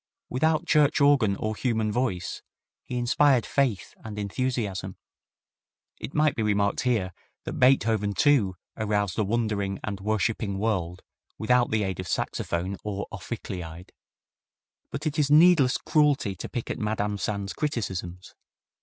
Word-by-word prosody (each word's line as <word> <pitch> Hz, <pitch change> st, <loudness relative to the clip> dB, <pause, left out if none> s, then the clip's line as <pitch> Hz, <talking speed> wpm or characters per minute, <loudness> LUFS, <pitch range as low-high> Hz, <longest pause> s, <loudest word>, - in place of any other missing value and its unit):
Without 160 Hz, +5 st, +1 dB
church 150 Hz, -3 st, +3 dB
organ 140 Hz, -8 st, +4 dB
or 110 Hz, +2 st, -3 dB
human 110 Hz, -3 st, 0 dB
voice 105 Hz, -7 st, -2 dB, 0.4 s
he 125 Hz, -, -5 dB
inspired 125 Hz, 0 st, +3 dB
faith 130 Hz, -9 st, 0 dB
and 110 Hz, -2 st, -7 dB
enthusiasm." 100 Hz, -3 st, -2 dB, 1.0 s
It -, -, -7 dB
might 155 Hz, 0 st, +3 dB
be -, -, -2 dB
remarked 100 Hz, -1 st, +1 dB
here 110 Hz, -8 st, 0 dB, 0.3 s
that -, -, -5 dB
Beethoven, 110 Hz, -6 st, +3 dB
too, 125 Hz, -11 st, +3 dB, 0.2 s
aroused 105 Hz, -3 st, -1 dB
a -, -, +3 dB
wondering 105 Hz, -2 st, -1 dB
and 100 Hz, -2 st, -4 dB
worshipping 105 Hz, 0 st, -1 dB
world 95 Hz, -4 st, -2 dB, 0.3 s
without 120 Hz, +2 st, +2 dB
the 110 Hz, -1 st, +1 dB
aid 95 Hz, -2 st, -3 dB
of 90 Hz, -, -4 dB
saxophone 90 Hz, +4 st, -2 dB
or 100 Hz, -1 st, -3 dB
ophicleide. 90 Hz, -4 st, -7 dB, 1.0 s
But 140 Hz, +3 st, -6 dB
it 155 Hz, 0 st, -1 dB
is 145 Hz, -2 st, +2 dB
needless 150 Hz, -4 st, +6 dB
cruelty 145 Hz, -9 st, +2 dB
to -, -, -6 dB
pick 120 Hz, -3 st, -4 dB
at -, -, -4 dB
Madame 105 Hz, -1 st, -1 dB
Sand's 100 Hz, -3 st, -3 dB
criticisms. 95 Hz, -, -4 dB
110 Hz, 135 wpm, -26 LUFS, 100-130 Hz, 1.0 s, needless